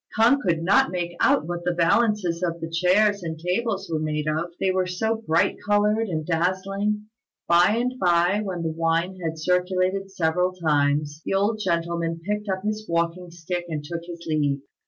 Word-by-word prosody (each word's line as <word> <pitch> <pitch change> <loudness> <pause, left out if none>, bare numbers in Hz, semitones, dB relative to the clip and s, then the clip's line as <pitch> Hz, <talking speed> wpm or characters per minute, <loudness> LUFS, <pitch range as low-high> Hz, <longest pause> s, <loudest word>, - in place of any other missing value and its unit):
K'ung 240 +6 +5
could 165 - 0
not 195 0 +4
make 175 -1 -3
out 150 - +3
what 175 +1 -4
the 175 0 0
valances 180 -1 +2
of 170 -2 -2
the 165 - -4
chairs 190 +5 +2
and 160 -2 -5
tables 195 +4 -2
were 160 -2 -2
made 155 -1 -2
of: 160 +3 -1
they 190 - +2
were 185 -1 0
so 220 +5 0
very 225 0 -8
bright 160 - +2
coloured 210 +2 +2
and 155 -4 -3
dazzling. 195 +5 -1 0.4
By 175 +5 +5
and 245 +2 0
by, 175 +3 +3
when 180 -4 -4
the 160 - -1
wine 165 +3 0
had 165 -2 -3
circulated 185 +3 0
several 180 0 0
times, 150 -3 0
the - - -1
old 210 +3 +1
gentleman 170 -1 -1
picked 210 0 -2
up 190 0 -2
his 215 0 -3
walking 170 +1 -1
stick 175 +1 -4
and 150 -2 -3
took 170 +3 -5
his 170 -1 -9
leave. 145 -3 0
180 Hz, 185 wpm, -24 LUFS, 165-195 Hz, 0.4 s, K'ung